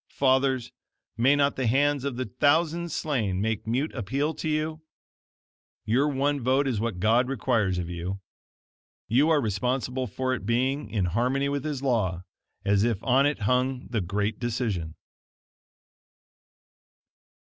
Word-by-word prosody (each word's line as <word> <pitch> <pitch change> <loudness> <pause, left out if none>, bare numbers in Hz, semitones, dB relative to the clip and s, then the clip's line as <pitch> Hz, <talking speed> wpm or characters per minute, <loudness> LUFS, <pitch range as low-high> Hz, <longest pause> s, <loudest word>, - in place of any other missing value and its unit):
Fathers, 130 -2 +1 0.4
may 130 +5 +4
not 140 0 +1
the 130 -2 0
hands 140 +3 +2
of 140 -3 -2
the 130 +1 -2
"thousands 160 +7 +1
slain" 115 -13 -1
make 110 +1 -2
mute 130 +7 -1
appeal 135 +7 -1
to 160 - -4
you? 155 +1 -1 1.0
Your 130 +7 +2
one 145 0 0
vote 130 +3 +2
is 120 -6 0
what 110 -5 -2
God 115 +5 +3
requires 115 -8 0
of 90 -1 -3
you. 90 +3 -4 0.9
You 135 +8 +3
are 160 -2 +4
responsible 125 +3 -1
for 130 +5 -2
it 120 - -4
being 130 +6 0
in 100 -5 0
harmony 125 +9 0
with 140 -1 -2
His 145 -3 -3
law 100 -9 0 0.4
as 100 0 +3
if 115 -3 +1
on 135 +2 +4
it 145 -5 -2
hung 125 +4 0
the 115 -4 0
great 100 +4 -2
decision. 110 -9 -2
125 Hz, 145 wpm, -26 LUFS, 110-140 Hz, 1.0 s, may